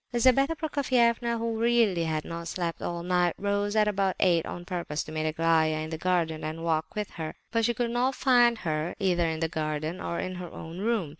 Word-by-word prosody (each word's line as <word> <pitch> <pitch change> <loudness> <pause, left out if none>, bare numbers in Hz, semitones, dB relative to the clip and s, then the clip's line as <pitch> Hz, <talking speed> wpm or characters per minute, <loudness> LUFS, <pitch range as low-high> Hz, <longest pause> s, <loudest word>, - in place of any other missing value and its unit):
Lizabetha 260 +5 +3
Prokofievna, 245 -6 +1
who 225 -1 -2
really 230 -7 +3
had 155 -1 -2
not 170 0 -6
slept 170 -1 -3
all 170 0 -3
night, 180 -1 +2
rose 205 +1 -1
at 215 -1 +4
about 195 -2 +1
eight 170 -3 +3
on 175 - -6
purpose 170 -4 -3
to - - -10
meet 155 0 -1
Aglaya 160 0 +2
in 155 +1 -4
the 160 - -3
garden 165 -3 0
and 160 +1 -4
walk 160 -1 -1
with 210 -1 -3
her; 160 -2 -6 0.2
but 230 0 +2
she 240 - +1
could 235 0 -1
not 250 +2 +1
find 240 -3 +4
her 155 +1 -1
either 180 -4 +1
in 160 0 -3
the 165 - +2
garden 155 +2 -3
or 170 - -3
in 185 0 -3
her 180 -1 -6
own 165 +2 -8
room. 215 -6 0
180 Hz, 215 wpm, -28 LUFS, 160-230 Hz, 0.2 s, at